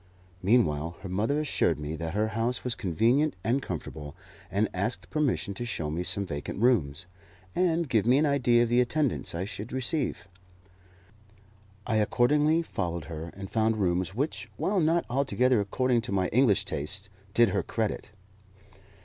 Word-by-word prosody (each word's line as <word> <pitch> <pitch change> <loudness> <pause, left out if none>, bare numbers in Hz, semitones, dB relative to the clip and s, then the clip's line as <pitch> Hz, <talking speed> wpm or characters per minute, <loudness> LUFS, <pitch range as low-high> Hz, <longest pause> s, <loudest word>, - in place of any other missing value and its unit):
Meanwhile 85 -7 +2
her 95 - -7
mother 110 +11 0
assured 150 -2 +1
me 75 +1 -4
that 80 +3 -5
her 110 +1 +1
house 115 +3 -1
was 125 - +2
convenient 120 - +1
and 125 +6 +1
comfortable, 80 - -6 0.3
and 105 +2 +1
asked 100 +6 -3
permission 145 -9 0
to 110 - -5
show 80 -10 -3
me 80 +3 -2
some 95 +3 0
vacant 75 +1 -5
rooms, 90 - +2 0.5
and 170 -2 +1
give 115 -4 +1
me 125 +2 +5
an 150 - +3
idea 125 -5 +3
of 120 - -1
the 120 +1 +4
attendance 130 - -1
I 90 +3 -2
should 105 +2 -7
receive. 130 - -1 1.6
I 110 - +1
accordingly 150 +9 +3
followed 85 - -3
her, 80 +2 -6
and 95 -1 -7
found 110 0 +1
rooms 95 0 0
which, 140 +6 -2
while 200 0 +1
not 165 +1 +2
altogether 130 -2 +2
according 120 +4 +1
to 110 - -5
my 95 -2 +1
English 120 -4 +3
tastes, 95 +7 -2 0.2
did 120 -2 +6
her - - 0
credit. 110 -2 -3
110 Hz, 160 wpm, -28 LUFS, 90-130 Hz, 1.6 s, did